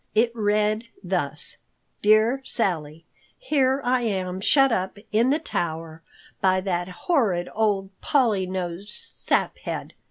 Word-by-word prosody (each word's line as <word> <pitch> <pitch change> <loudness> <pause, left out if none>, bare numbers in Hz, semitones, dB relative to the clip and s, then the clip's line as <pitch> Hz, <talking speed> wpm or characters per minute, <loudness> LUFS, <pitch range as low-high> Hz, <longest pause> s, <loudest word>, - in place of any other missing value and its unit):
It 230 +2 +4
read 215 +1 +1 0.2
thus: - - -2 0.4
Dear 215 +5 +4
Sally:— 165 - 0 0.3
Here 275 - +1
I 250 0 +2
am 190 -4 -2
shut 270 +5 +4
up 190 -1 -1
in 230 +4 +3
the 290 - +3
tower 160 - -4 0.4
by 185 -1 +3
that 180 -2 -2
horrid 190 - 0
old 205 -3 0
Polly 220 -9 +2
nosed 185 +1 -4
Saphead. - - -2
205 Hz, 120 wpm, -24 LUFS, 185-235 Hz, 0.4 s, It